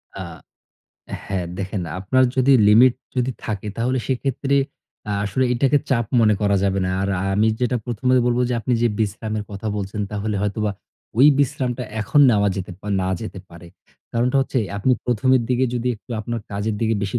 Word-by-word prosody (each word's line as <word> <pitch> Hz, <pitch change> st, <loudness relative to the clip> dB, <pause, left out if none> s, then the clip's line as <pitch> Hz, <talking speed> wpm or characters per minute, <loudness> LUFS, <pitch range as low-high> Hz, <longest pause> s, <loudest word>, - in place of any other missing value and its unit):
আ 95 Hz, -, -6 dB, 1.1 s
হ্যাঁ, 95 Hz, -3 st, -2 dB
দেখেন 95 Hz, -1 st, -3 dB, 0.2 s
আপনার 130 Hz, +8 st, +2 dB
যদি 130 Hz, +2 st, +4 dB, 0.2 s
লিমিট 120 Hz, +4 st, +6 dB, 0.2 s
যদি 125 Hz, +1 st, +1 dB
থাকে 105 Hz, -1 st, -4 dB
তাহলে 125 Hz, +3 st, 0 dB
সেক্ষেত্রে 135 Hz, +1 st, 0 dB, 0.5 s
আ -, -, 0 dB
আসলে 115 Hz, +6 st, 0 dB
এটাকে 135 Hz, +3 st, +3 dB
চাপ 120 Hz, -4 st, +2 dB
মনে 105 Hz, -2 st, +4 dB
করা 100 Hz, -1 st, +2 dB
যাবে 100 Hz, 0 st, +1 dB
না। 90 Hz, -, -1 dB
আর 100 Hz, -, -1 dB
আ -, -, -2 dB
আমি 110 Hz, +1 st, +3 dB
যেটা 125 Hz, 0 st, +1 dB
প্রথমে 125 Hz, +2 st, 0 dB
বলবো 120 Hz, 0 st, +1 dB
যে, -, -, -1 dB
আপনি 125 Hz, +4 st, -1 dB
যেই 120 Hz, -2 st, +2 dB
বিশ্রামের 110 Hz, 0 st, -2 dB
কথা 100 Hz, +2 st, -6 dB
বলছেন 100 Hz, +1 st, -4 dB
তাহলে 105 Hz, +1 st, -2 dB
হয়তোবা 105 Hz, +1 st, -1 dB, 0.5 s
ওই 135 Hz, -, +8 dB
বিশ্রামটা 130 Hz, -3 st, 0 dB, 0.2 s
এখন 125 Hz, +7 st, +3 dB
নেওয়া 105 Hz, -2 st, +3 dB
যেতে 95 Hz, -1 st, -5 dB
পা 105 Hz, -, -8 dB
না 95 Hz, -, -1 dB
যেতে 110 Hz, -3 st, -6 dB
পারে। 85 Hz, +1 st, -13 dB, 0.5 s
কারণটা 125 Hz, +3 st, +1 dB
হচ্ছে 135 Hz, -1 st, -1 dB, 0.2 s
আপনি 100 Hz, +6 st, +2 dB
প্রথমের 125 Hz, +1 st, +2 dB
দিকে 125 Hz, +1 st, +2 dB
যদি 120 Hz, +1 st, -1 dB
একটু 105 Hz, +4 st, -24 dB
আপনার 115 Hz, +1 st, -4 dB
কাজের 105 Hz, +2 st, -2 dB
দিকে 115 Hz, 0 st, +1 dB
বেশি 100 Hz, +5 st, -1 dB
110 Hz, 180 wpm, -21 LUFS, 100-125 Hz, 1.1 s, ওই